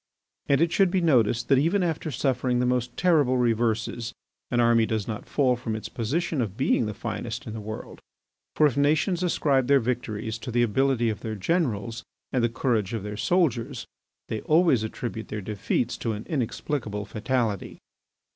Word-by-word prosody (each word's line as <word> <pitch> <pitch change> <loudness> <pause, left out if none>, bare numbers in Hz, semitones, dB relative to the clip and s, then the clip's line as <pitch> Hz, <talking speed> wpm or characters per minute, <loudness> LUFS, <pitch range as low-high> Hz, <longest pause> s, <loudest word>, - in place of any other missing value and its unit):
And 140 +1 +3
it 165 0 +3
should 195 0 +4
be 185 - +1
noticed 120 -8 +2
that 135 -2 +5
even 175 +7 +2
after 160 -2 -2
suffering 130 -1 0
the 125 - +2
most 125 -1 -1
terrible 150 -8 +3
reverses 115 -1 0 0.3
an 120 - +1
army 115 -1 +4
does 110 -3 -2
not 110 -2 -5
fall 130 -4 +2
from 115 -2 -4
its 110 - -6
position 145 +6 -1
of 105 -3 -3
being 130 -4 +2
the 105 - -5
finest 115 +1 -5
in 110 - -6
the 110 - -5
world. 110 +1 -7 0.6
For 155 - +5
if 140 -5 +2
nations 155 +6 +2
ascribe 140 -7 +2
their 140 0 +5
victories 115 -2 -3
to 125 - -7
the 120 0 +2
ability 120 +1 +2
of 105 - -6
their 110 -1 -4
generals 115 - -1 0.3
and 125 -3 +2
the 120 - +3
courage 115 -3 0
of 110 - -4
their 105 0 -5
soldiers, 130 - 0 0.4
they 110 - -3
always 155 -6 +4
attribute 110 0 -5
their 105 - -4
defeats 105 +4 -2
to 115 - -2
an 105 +2 -6
inexplicable 120 -6 -2
fatality. 110 -1 -2
120 Hz, 180 wpm, -26 LUFS, 110-140 Hz, 0.6 s, that